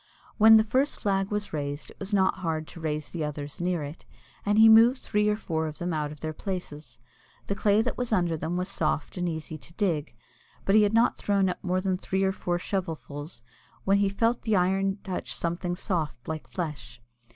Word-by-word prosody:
When 220 +1 +9
the 220 - +5
first 260 +6 0
flag 195 -1 0
was 210 -3 -3
raised 145 -1 -4
it - - -19
was 195 +1 -4
not 190 -2 +2
hard 160 -3 -2
to - - -11
raise 155 -2 -3
the 165 -3 -4
others 150 +2 -5
near 175 -3 0
it, 145 +4 -8 0.4
and 205 +1 +1
he 220 +1 +8
moved 230 +4 +7
three 210 0 +1
or 210 - +2
four 160 -6 -2
of 155 - -7
them 175 0 -2
out 150 -1 -2
of 150 - -11
their 155 0 -3
places. 155 - -6 0.5
The - - -1
clay 205 +1 +3
that 250 - -3
was 245 -2 -1
under 175 -5 +2
them 160 +3 -3
was 180 0 -1
soft 155 -6 -1
and 180 -1 0
easy 160 -1 -6
to 170 - -13
dig, 170 -7 -1 0.5
but 195 - +2
he 215 - +7
had 210 +1 +2
not 230 +2 +3
thrown 200 -2 +1
up 180 - -5
more 185 0 0
than 185 -1 0
three 190 +1 -1
or 190 - +3
four 175 -2 -2
shovelfuls, 160 - -5 0.4
when 195 +1 +3
he 200 -1 +3
felt 230 +4 +1
the 220 -2 +1
iron 195 +2 +1
touch 185 - -4
something 175 +1 -2
soft 165 - -3
like 160 -1 -5
flesh. 150 -8 -5
180 Hz, 215 wpm, -27 LUFS, 160-205 Hz, 0.5 s, When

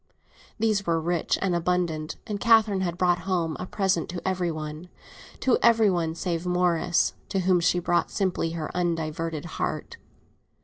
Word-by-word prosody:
These 215 -4 0
were 165 -1 +2
rich 170 +1 0
and 190 -2 +1
abundant; 170 -2 -1
and 210 -3 -4
Catherine 220 -4 +4
had 175 -2 -2
brought 180 -1 +2
home 170 -4 -1
a 185 - -5
present 190 -4 0
to 175 +1 -5
every 185 -2 0
one—to 155 +10 -4
every 225 -3 +5
one 165 -3 -1
save 170 -1 -2
Morris, 180 -1 +1 0.2
to 195 - 0
whom 185 0 +3
she 175 +1 +2
had 175 - -4
brought 175 - +2
simply 180 -4 -1
her 155 -2 -4
undiverted 165 -2 -2 0.2
heart. - - -3
175 Hz, 160 wpm, -26 LUFS, 165-190 Hz, 0.2 s, every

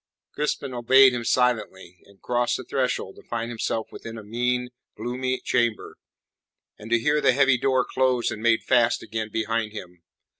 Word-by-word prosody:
Crispin 145 -2 -2
obeyed 130 +2 +5
him 120 -1 -3
silently, 110 -8 -1
and 100 -1 -21
crossed 120 0 0
the 130 - -7
threshold 125 -7 -2
to - - -17
find 115 0 -3
himself 115 -1 -3
within 115 0 -9
a 110 - -9
mean, 125 +3 -1 0.3
gloomy 130 +1 -2
chamber, 120 -3 -1 0.8
and 110 - -10
to 120 - +4
hear 150 +6 +1
the 130 - +4
heavy 135 -1 +3
door 130 -1 +2
closed 130 -2 +1
and 105 - -6
made 115 0 +2
fast 120 -1 +2
again 110 0 -4
behind 110 0 -2
him. 90 -5 -10
120 Hz, 165 wpm, -24 LUFS, 110-130 Hz, 0.8 s, obeyed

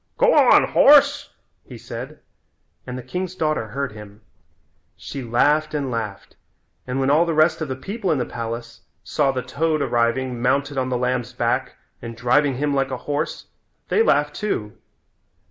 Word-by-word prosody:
"Go - - +4
on, - - +6
horse," 285 0 +5 0.3
he - - -11
said - - -8 0.7
and 125 0 -5
the 130 - -7
king's 180 +8 -4
daughter 155 -9 -1
heard 135 +4 -4
him. 105 0 -12 0.8
She 140 - -7
laughed 145 +6 +1
and 140 -3 -2
laughed, 110 -4 -5 0.5
and 130 +1 -2
when 135 +1 +2
all 155 +3 +5
the 165 -2 -2
rest 160 +1 +3
of 155 - -2
the 130 - -3
people 195 - -3
in 155 - +1
the 125 - -1
palace 115 0 -6 0.2
saw 140 -2 +1
the 130 -2 -3
toad 155 +5 -1
arriving 120 -1 0
mounted 140 +3 0
on 130 0 -1
the 125 - 0
lamb's 125 -1 -2
back - - -1 0.3
and 115 -1 -8
driving 130 +3 +2
him 145 +2 -1
like 135 -1 0
a 130 - -3
horse 145 +2 -3 0.4
they 440 - +3
laughed 455 - +2
too. 110 - -3
135 Hz, 170 wpm, -22 LUFS, 120-155 Hz, 0.8 s, on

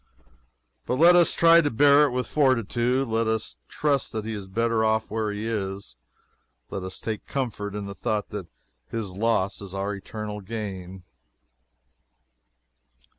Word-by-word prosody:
But - - +1
let 170 +6 +7
us 175 -1 +5
try 170 0 +7
to 145 - 0
bear 145 +4 +6
it 140 - -1
with 125 0 -1
fortitude. 130 -1 +1
Let 115 0 0
us 110 -1 -2
trust 145 -3 0
that 110 -1 -3
he 110 - -3
is 100 -3 -6
better 115 +3 +1
off 110 -1 +1
where 110 -1 -1
he 105 +2 -4
is. 100 - -4 0.8
Let 95 - -3
us 95 0 -6
take 110 -2 -5
comfort 110 -6 -3
in 105 -1 -4
the 100 - -6
thought 105 0 -2
that 100 -4 -6 0.4
his 110 -4 -4
loss 100 -2 0
is 100 -1 -8
our 100 +1 -2
eternal 105 +1 -6
gain. 95 -3 -6
110 Hz, 155 wpm, -25 LUFS, 100-125 Hz, 0.8 s, let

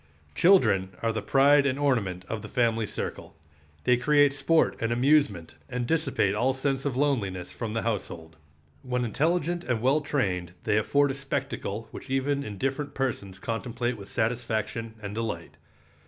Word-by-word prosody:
Children 100 - +4
are 115 -1 +1
the 110 - -2
pride 140 +3 +5
and 135 -1 0
ornament 105 -11 0
of 110 -2 -4
the - - -8
family 115 -3 +1
circle. - - -6 0.5
They 125 +6 +4
create 145 +2 +4
sport 150 +3 +2
and 115 0 -1
amusement 120 - +2 0.2
and 125 -1 -2
dissipate 155 -9 +1
all 130 +5 +1
sense 135 0 -1
of 135 -3 -1
loneliness 105 -11 0
from 115 -3 -5
the 115 - -1
household. 85 -7 -4 0.5
When 125 -1 -1
intelligent 170 - 0
and 120 -7 -1
well 135 +6 +3
trained 90 - -1
they 105 - +2
afford 140 +5 +2
a - - -3
spectacle 135 -5 -4
which - - -10
even 140 +1 0
indifferent 135 +7 -3
persons 110 -8 -2
contemplate 120 +3 -3
with 100 -3 -10
satisfaction 115 -1 -2
and 100 0 -5
delight. 105 -7 -4
125 Hz, 155 wpm, -27 LUFS, 105-140 Hz, 0.5 s, pride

